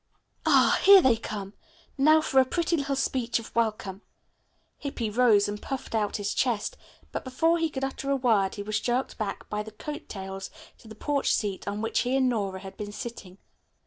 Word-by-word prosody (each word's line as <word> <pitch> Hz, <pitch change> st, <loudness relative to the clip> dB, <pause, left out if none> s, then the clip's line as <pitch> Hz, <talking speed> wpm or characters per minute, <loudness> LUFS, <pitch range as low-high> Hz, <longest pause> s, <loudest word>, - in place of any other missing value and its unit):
"Ah, -, -, +5 dB
here 395 Hz, 0 st, +10 dB
they 260 Hz, -9 st, +4 dB
come! 205 Hz, -3 st, -6 dB, 0.4 s
Now 310 Hz, +3 st, +5 dB
for 270 Hz, -3 st, +3 dB
a -, -, +4 dB
pretty 340 Hz, +5 st, 0 dB
little 280 Hz, -3 st, -1 dB
speech 250 Hz, -3 st, 0 dB
of 230 Hz, -, -9 dB
welcome." 215 Hz, -4 st, -1 dB, 0.8 s
Hippy 240 Hz, -7 st, -3 dB
rose 220 Hz, -3 st, +4 dB
and 205 Hz, 0 st, -5 dB
puffed 270 Hz, -3 st, -5 dB
out 215 Hz, -2 st, 0 dB
his 205 Hz, 0 st, -2 dB
chest, 235 Hz, -5 st, 0 dB, 0.4 s
but -, -, -4 dB
before 325 Hz, +6 st, +1 dB
he 325 Hz, -1 st, +1 dB
could 270 Hz, -3 st, -5 dB
utter 270 Hz, +1 st, -3 dB
a 275 Hz, -, +3 dB
word 220 Hz, -7 st, +2 dB
he 205 Hz, -, -5 dB
was 215 Hz, 0 st, -1 dB
jerked 245 Hz, +1 st, -2 dB
back 205 Hz, -2 st, -4 dB
by 210 Hz, 0 st, -2 dB
the 215 Hz, -, -7 dB
coat 295 Hz, +8 st, -8 dB
tails 195 Hz, -1 st, -6 dB, 0.3 s
to 230 Hz, -, -16 dB
the 220 Hz, -, -10 dB
porch 285 Hz, +5 st, 0 dB
seat 200 Hz, -3 st, -1 dB
on 205 Hz, +1 st, -3 dB
which 225 Hz, -, 0 dB
he 250 Hz, +1 st, 0 dB
and 260 Hz, -1 st, +3 dB
Nora 195 Hz, -5 st, -2 dB
had 190 Hz, -1 st, -10 dB
been 205 Hz, -1 st, -5 dB
sitting. 205 Hz, -4 st, -8 dB
230 Hz, 200 wpm, -27 LUFS, 205-270 Hz, 0.8 s, here